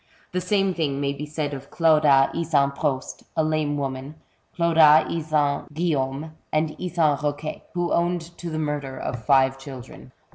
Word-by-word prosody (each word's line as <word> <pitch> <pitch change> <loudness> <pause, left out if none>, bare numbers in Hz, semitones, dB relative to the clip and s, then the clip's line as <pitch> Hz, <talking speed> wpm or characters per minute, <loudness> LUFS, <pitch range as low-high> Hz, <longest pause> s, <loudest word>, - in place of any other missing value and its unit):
The 180 - -1
same 195 +1 +1
thing 145 -5 -1
may 140 0 0
be 150 +2 -6
said 150 -1 -3
of 135 0 -8
Clauda 150 -5 +4
Isan 150 -4 +1
Prost, 140 -2 -3 0.2
a 160 - +3
lame 155 -2 0
woman, 135 +1 -4 0.4
Clauda 160 -3 +6
Isan 155 -3 0
GuiUaume, 150 -2 -1 0.2
and 155 0 +1
Isan 165 -5 +1
Eoquet, 145 +1 -3
who 175 -1 0
owned 170 0 -1
to 175 - -5
the 155 - -4
murder 145 -3 -3
of 120 -2 -5
five 135 +2 +3
children. 130 -2 -10
150 Hz, 155 wpm, -24 LUFS, 140-165 Hz, 0.4 s, Clauda